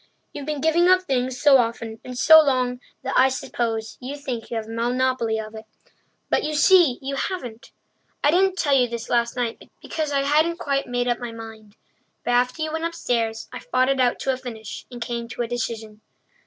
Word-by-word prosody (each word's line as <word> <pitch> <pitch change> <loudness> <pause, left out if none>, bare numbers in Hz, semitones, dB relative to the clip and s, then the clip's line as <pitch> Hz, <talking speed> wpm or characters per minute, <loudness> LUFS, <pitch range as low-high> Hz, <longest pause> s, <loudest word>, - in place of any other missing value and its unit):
You've 285 0 -7
been 300 -2 -3
giving 330 +3 +3
up 370 0 +5
things 255 -5 -1
so 280 -3 +6
often 230 -1 -2
and 250 -1 -8
so 315 +4 +8
long 255 -4 0 0.2
that - - -3
I 260 +1 +6
suppose 225 -4 -3
you 265 +3 -5
think 255 -5 -5
you 230 - -3
have 220 - -3
a 225 - -10
monopoly 240 -1 0
of 215 0 -7
it; 220 0 -9 0.6
but - - +1
you 305 0 -2
see 330 -5 +5
you 275 +1 -3
haven't. 270 -5 -5 0.5
I 290 - +5
didn't 375 +2 +2
tell 290 -6 +1
you 250 -2 +4
this 235 -1 -6
last 235 -1 +1
night 240 -2 -4
because 310 -2 -3
I 280 -1 +2
hadn't 310 +4 +2
quite 275 -3 -1
made 245 0 -1
up 240 - 0
my 240 -2 -5
mind. 220 -2 -11 0.5
But - - 0
after 250 +5 +1
you 310 0 -3
went 320 0 -2
upstairs, 230 -9 -2
I 250 - -5
fought 255 +1 +1
it 270 -1 +1
out 245 -1 +2
to 265 - +1
a - - -4
finish 225 -5 -8
and 245 - -9
came 235 -1 -4
to 235 +1 -4
a - - -4
decision. 220 -2 -5
250 Hz, 210 wpm, -23 LUFS, 230-285 Hz, 0.6 s, so